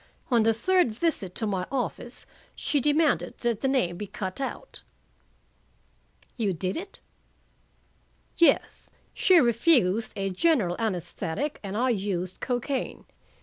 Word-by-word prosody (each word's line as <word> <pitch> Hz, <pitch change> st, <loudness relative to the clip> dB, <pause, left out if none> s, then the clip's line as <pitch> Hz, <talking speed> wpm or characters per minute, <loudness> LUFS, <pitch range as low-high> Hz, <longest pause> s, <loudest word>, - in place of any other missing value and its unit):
On 235 Hz, -2 st, +5 dB
the 225 Hz, +1 st, +4 dB
third 245 Hz, +1 st, +2 dB
visit 220 Hz, -, -1 dB
to 225 Hz, -, -1 dB
my 190 Hz, -3 st, -2 dB
office 250 Hz, -2 st, -4 dB, 0.3 s
she 290 Hz, -, 0 dB
demanded 295 Hz, +2 st, +2 dB
that 235 Hz, -3 st, 0 dB
the 270 Hz, -, +1 dB
name 245 Hz, -11 st, +1 dB
be 210 Hz, -, -5 dB
cut 190 Hz, +3 st, -5 dB
out." 275 Hz, -, -5 dB, 1.6 s
"You 210 Hz, -5 st, 0 dB
did 185 Hz, +3 st, -3 dB
it?" 390 Hz, +4 st, -7 dB, 1.4 s
"Yes. 340 Hz, -, +3 dB, 0.2 s
She 370 Hz, -2 st, +5 dB
refused 235 Hz, -, +3 dB
a 195 Hz, -1 st, -2 dB
general 195 Hz, -, +2 dB
anesthetic 200 Hz, -, -3 dB
and 200 Hz, 0 st, -5 dB
I 255 Hz, +3 st, +2 dB
used 190 Hz, -4 st, -3 dB
cocaine. 250 Hz, +1 st, -3 dB
230 Hz, 125 wpm, -27 LUFS, 190-275 Hz, 1.6 s, On